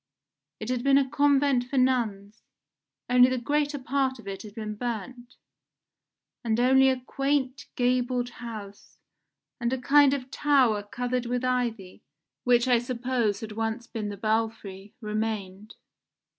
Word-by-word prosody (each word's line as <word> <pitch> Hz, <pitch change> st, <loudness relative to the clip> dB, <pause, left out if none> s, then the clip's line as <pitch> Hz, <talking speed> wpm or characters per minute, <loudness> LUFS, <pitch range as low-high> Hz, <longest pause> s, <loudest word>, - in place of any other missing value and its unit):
It 215 Hz, -, -5 dB
had 250 Hz, -1 st, -1 dB
been 275 Hz, 0 st, +5 dB
a 275 Hz, -1 st, +2 dB
convent 280 Hz, -2 st, +2 dB
for 265 Hz, +2 st, -4 dB
nuns, 230 Hz, -5 st, 0 dB, 0.7 s
only 250 Hz, 0 st, +6 dB
the 255 Hz, -, -1 dB
greater 290 Hz, +4 st, 0 dB
part 265 Hz, 0 st, -1 dB
of 230 Hz, -, -14 dB
it 195 Hz, -1 st, -5 dB
had 210 Hz, -1 st, -11 dB
been 215 Hz, -2 st, -4 dB
burnt, 240 Hz, +2 st, -6 dB, 1.1 s
and 225 Hz, -1 st, 0 dB
only 265 Hz, +2 st, +5 dB
a 260 Hz, -1 st, 0 dB
quaint 275 Hz, +1 st, -2 dB
gabled 245 Hz, 0 st, 0 dB
house, 210 Hz, -4 st, -9 dB, 0.6 s
and 235 Hz, 0 st, -1 dB
a 260 Hz, -, 0 dB
kind 280 Hz, +2 st, +5 dB
of 260 Hz, -1 st, -7 dB
tower 260 Hz, -8 st, +3 dB
covered 245 Hz, +3 st, -3 dB
with 245 Hz, +1 st, -1 dB
ivy, 235 Hz, -7 st, -2 dB, 0.4 s
which 245 Hz, 0 st, +4 dB
I 245 Hz, -2 st, +4 dB
suppose 240 Hz, -3 st, -1 dB
had 220 Hz, -1 st, -6 dB
once 225 Hz, +2 st, -3 dB
been 215 Hz, -3 st, -5 dB
the 205 Hz, -, -6 dB
belfry, 215 Hz, -2 st, -3 dB
remained. 215 Hz, -2 st, -4 dB
245 Hz, 145 wpm, -27 LUFS, 220-260 Hz, 1.1 s, only